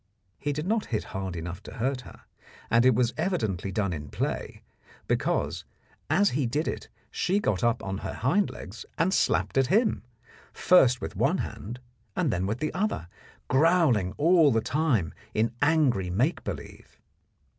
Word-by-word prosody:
He 145 - -1
did 150 +2 -3
not 215 +3 0
hit 110 - -1
hard 95 -2 -5
enough 85 +2 -6
to - - -11
hurt 130 +2 -1
her, - - -14 0.5
and 115 +2 +5
it 130 - +5
was 120 0 +2
evidently 110 - -1
done 100 -3 -1
in 75 -2 -6
play, - - -4 0.4
because - - 0 0.5
as 195 +7 +3
he 135 -1 0
did 150 +7 -1
it - - -4 0.2
she 190 +3 +1
got 105 - 0
up 120 0 +1
on 95 0 -3
her - - -5
hind 180 - +1
legs 105 +4 -9
and 175 +4 +2
slapped 135 - +2
at 135 - +3
him, 220 - +2 0.5
first 130 -9 +4
with - - -5
one - - +2
hand 120 +5 -6 0.4
and - - +1
then 90 +1 -1
with 105 +3 -1
the 155 - -3
other, 190 - -2 0.4
growling 135 - +3
all 165 -1 +5
the 115 - +3
time 125 - 0 0.2
in 115 +2 +1
angry 145 - +2
make 125 - 0
believe. 80 -8 -8
125 Hz, 165 wpm, -27 LUFS, 100-160 Hz, 0.5 s, and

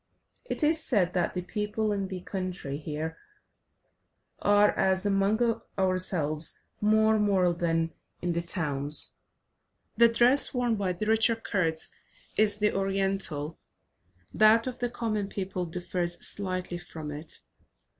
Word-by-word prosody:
It - - -2
is 315 +1 +3
said 185 -8 +1
that 175 0 0
the 180 - -2
people 210 +2 -2
in 200 -1 -1
the 185 -1 -6
country 180 -8 -4
here 155 +1 -5 1.2
are, 205 0 +4
as 190 +1 +2
among 205 +4 +2 0.2
ourselves, 180 -5 0 0.2
more 220 +1 +4
moral 190 -4 +3
than 165 -1 0 0.3
in 175 0 -1
the 170 - 0
towns. 150 -4 -1 0.8
The 235 - +8
dress 245 +4 +4
worn 245 -2 +1
by 195 -3 -1
the 180 +5 -4
richer 225 +1 +4
Kurds 175 -8 -1 0.5
is 210 -1 +4
the 210 0 +2
Oriental, 195 -6 -1 0.7
that 215 +1 +5
of 255 -1 -5
the 245 -1 0
common 215 -4 -2
people 185 -3 -3
differs 175 +1 -3
slightly 185 -3 -3
from 160 -3 -8
it. 150 +2 -7
190 Hz, 130 wpm, -28 LUFS, 175-215 Hz, 1.2 s, The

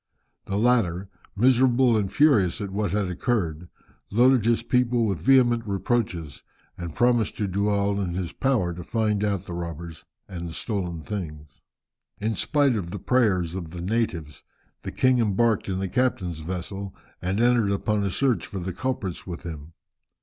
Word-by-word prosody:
The 100 - -2
latter, 100 -6 +2 0.3
miserable 125 +1 +4
and 100 -3 0
furious 110 - +3
at 100 -2 -4
what 100 0 -1
had 100 +1 0
occurred, 90 - -2 0.4
loaded 120 +1 +4
his 115 0 +2
people 120 -1 +2
with 95 -7 -1
vehement 120 +1 +4
reproaches, 95 - -2 0.3
and 85 -3 -7
promised 120 -3 +2
to 105 - -1
do 100 +2 0
all 100 0 +1
in 90 -3 -3
his 90 -2 -3
power 120 -10 +1
to 85 - -7
find 105 +2 0
out 100 -4 -1
the 85 - -7
robbers 85 -1 -6 0.2
and 85 -3 -6
the - - -8
stolen 90 -7 -3
things. 75 -8 -7 0.6
In 110 +2 -1
spite 145 0 +2
of 95 -6 -3
the - - -5
prayers 100 -10 +1
of 90 -4 -5
the 85 +1 -7
natives, 85 - -2 0.4
the - - -6
king 130 -1 +3
embarked 110 -1 +1
in 95 - -1
the 95 0 -2
captain's 95 -7 0
vessel, 95 +4 -5 0.3
and 95 +3 -1
entered 120 -3 +3
upon 105 +1 0
a 100 - 0
search 130 +5 0
for 100 - -7
the 95 0 -4
culprits 100 -6 -3
with 85 -2 -6
him. 80 -1 -8
100 Hz, 170 wpm, -25 LUFS, 85-120 Hz, 0.6 s, miserable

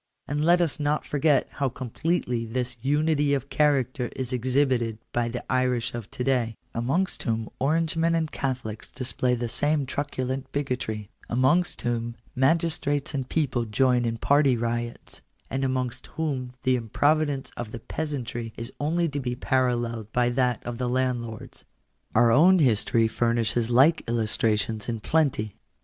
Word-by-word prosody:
And 145 +1 -1
let 175 +2 +5
us 160 -3 0
not 150 +1 0
forget 145 0 +2
how 140 -2 -1
completely 125 0 -2
this 125 +2 -3
unity 145 +1 +2
of 135 0 -5
character 135 -4 +1
is 130 -1 -3
exhibited 125 -2 +1 0.2
by 120 -1 0
the 120 +1 -5
Irish 125 -2 0
of 115 -3 -6
to 125 - -4
day, 125 -4 +1 0.2
amongst 140 +12 0
whom 115 -2 -2
Orangemen 165 +3 +1
and 160 -2 -1
Catholics 125 -5 -4
display 125 -1 0
the 120 0 -2
same 145 +5 +1
truculent 130 -1 -3
bigotry; 125 -7 -3 0.2
amongst 130 +9 +2
whom 120 -1 -2 0.2
magistrates 145 0 +1
and 135 -2 -3
people 130 -7 0
join 125 +3 +2
in 115 0 -1
party 140 0 +3
riots; 120 0 -4 0.3
and 135 +1 -1
amongst 130 -2 -2
whom 135 -6 -2
the 130 0 +3
improvidence 145 +4 +1
of 120 -2 -5
the 115 - -6
peasantry 120 -4 -4
is 115 +2 -6
only 165 +4 +1
to 145 -2 -3
be 125 -2 -2
paralleled 120 -4 0
by 120 0 +2
that 125 -1 +1
of 120 0 -5
the 125 -1 0
landlords. 120 -3 -2 0.5
Our 120 0 +5
own 175 +9 +6
history 115 - +3
furnishes 115 0 +1
like 135 +7 +5
illustrations 110 -1 0
in 115 -1 -2
plenty. 130 -7 0
130 Hz, 150 wpm, -26 LUFS, 120-145 Hz, 0.5 s, own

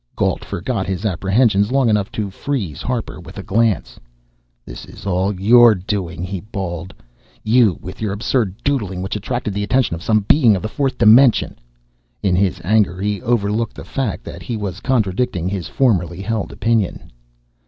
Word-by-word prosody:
Gault - - 0
forgot 95 +1 -3
his 95 +3 -3
apprehensions 100 +2 +2
long 135 -2 +3
enough 105 -3 +1
to 105 -3 -3
freeze 100 - -4
Harper 125 -3 -3
with - - -12
a - - -6
glance. 105 - 0 0.7
"This - - -9
is - - -13
all 95 0 0
your 115 +2 +7
doing," 90 -3 -4
he 95 +1 -4
bawled. 95 -4 -5 0.5
"You 110 -4 +3
with 95 +3 -9
your 105 -3 -1
absurd 105 -1 -1
doodling, 100 -10 -1
which 95 - -3
attracted 110 0 -3
the 100 - -2
attention 125 -1 +1
of 85 - -9
some 110 +1 +2
Being 115 +1 +4
of 95 - -4
the - - -1
fourth 135 +3 -1
dimension!" 120 +2 +5 0.6
In 95 -3 +2
his 95 0 +1
anger, 95 -1 +2
he 100 -1 -2
overlooked 115 -1 0
the - - -9
fact 130 -8 -3
that - - -9
he 120 - -4
was 100 -3 -5
contradicting 110 -6 0
his 95 -2 -3
formerly 95 -8 0
held 110 -1 -2
opinion. 115 - -1
105 Hz, 170 wpm, -19 LUFS, 95-115 Hz, 0.7 s, your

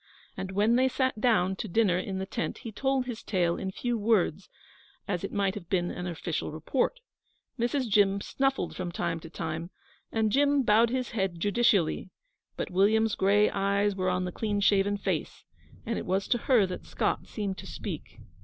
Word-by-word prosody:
And 190 0 -5
when 215 +4 +3
they 260 +1 +4
sat 260 -4 -1
down 190 -6 +3
to 215 - -4
dinner 190 -2 +2
in 190 +1 -4
the 190 - -2
tent 225 +4 -3
he 230 - -5
told 265 +3 0
his 245 -3 -5
tale 175 -4 +1
in 190 - -3
few 240 +4 -2
words, 200 -5 +1 0.6
as 180 -3 -2
it 195 - -3
might 200 -2 +1
have 195 -5 -9
been 175 -2 +1
an 180 0 -5
official 170 -2 -3
report. 245 - -1 0.6
Mrs. 245 +2 0
Jim 200 -2 +3
snuffled 270 +5 -1
from 180 -2 -4
time 170 -1 -2
to 165 - -11
time, 165 0 -4 0.4
and 220 -1 +1
Jim 285 +1 +3
bowed 225 +1 +4
his 255 0 -2
head 190 -6 -1
judicially; 205 -3 +2 0.5
but - - -3
William's 215 +4 +3
gray 205 +2 +3
eyes 200 +1 +1
were 185 -1 0
on 185 0 0
the 180 - -3
clean 205 +1 -1
shaven 200 0 +3
face, - - -3 0.4
and 230 0 -1
it - - -7
was 190 +2 0
to 240 - +2
her 240 -6 +6
that 180 -1 -7
Scott - - -1
seemed 200 -3 -4
to - - -9
speak. - - -7
200 Hz, 190 wpm, -28 LUFS, 185-230 Hz, 0.6 s, her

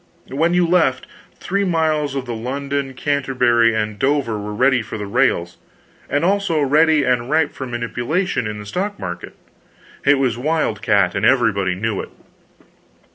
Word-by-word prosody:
When 165 +6 +1
you 180 -1 +3
left, 165 -7 +2 0.3
three 200 +2 -1
miles 155 -5 0
of 135 -2 -3
the 120 - -4
London, 135 +3 -3
Canterbury 125 -5 +2
and 105 -1 -2
Dover 130 -5 0
were 105 +1 -5
ready 125 +4 +2
for 110 - -7
the 105 - -5
rails, 100 -6 0 0.5
and 145 +4 +1
also 195 -4 +1
ready 150 +2 +3
and 125 -1 0
ripe 155 -1 +2
for 130 - -6
manipulation 120 - -2
in 105 0 -5
the 105 - -8
stock 200 - -3
market. 90 -1 -7 0.7
It 140 0 +4
was 125 -3 0
wildcat, 115 - +1
and 100 - -2
everybody 105 -7 +2
knew 105 +1 -2
it. - - -9
130 Hz, 155 wpm, -19 LUFS, 110-150 Hz, 0.7 s, It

